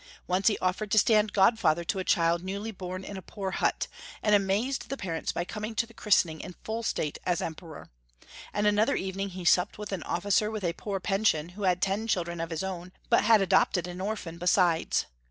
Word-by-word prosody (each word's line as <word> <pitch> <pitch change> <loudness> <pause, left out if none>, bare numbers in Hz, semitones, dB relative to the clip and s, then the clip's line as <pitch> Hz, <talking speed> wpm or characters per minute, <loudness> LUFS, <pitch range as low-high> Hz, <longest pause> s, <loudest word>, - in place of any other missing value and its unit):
Once 185 +2 +1
he 215 - +4
offered 185 +3 -1
to 215 - +1
stand 215 0 +4
godfather 190 -5 +3
to 190 - -2
a - - -1
child 170 0 +2
newly 200 +4 -4
born 185 -1 -6
in 200 0 -7
a - - -6
poor 195 +1 -5
hut, - - 0 0.4
and 210 - +3
amazed 205 +7 +1
the 275 - -3
parents 170 -7 -3
by 175 - -3
coming 215 +3 -5
to 230 - +1
the 230 - -18
christening 175 -8 +2
in 180 - -9
full 225 +1 -3
state 155 -9 -2
as 175 -2 0
Em 160 - -3
peror; 160 -3 -11 0.7
and 210 - -1
another 210 +1 +3
evening 195 +1 -3
he 185 -1 -8
supped 180 +3 +3
with 210 0 -7
an 190 -4 -3
oiKcer 205 +5 +1
A^th - - -14
a 170 - -1
poor 195 +2 -4
pension, 195 -5 +1
who 200 +3 -5
had 180 -1 +2
ten 200 +3 0
children 170 -5 -1
of 165 - -3
his 165 +1 -3
own, 185 -1 -5 0.2
but - - +4
had 220 -2 +6
adopted 190 -2 +3
an 180 +1 -7
orphan 190 -5 -4
besides. 175 -2 +2
190 Hz, 215 wpm, -28 LUFS, 175-210 Hz, 0.7 s, had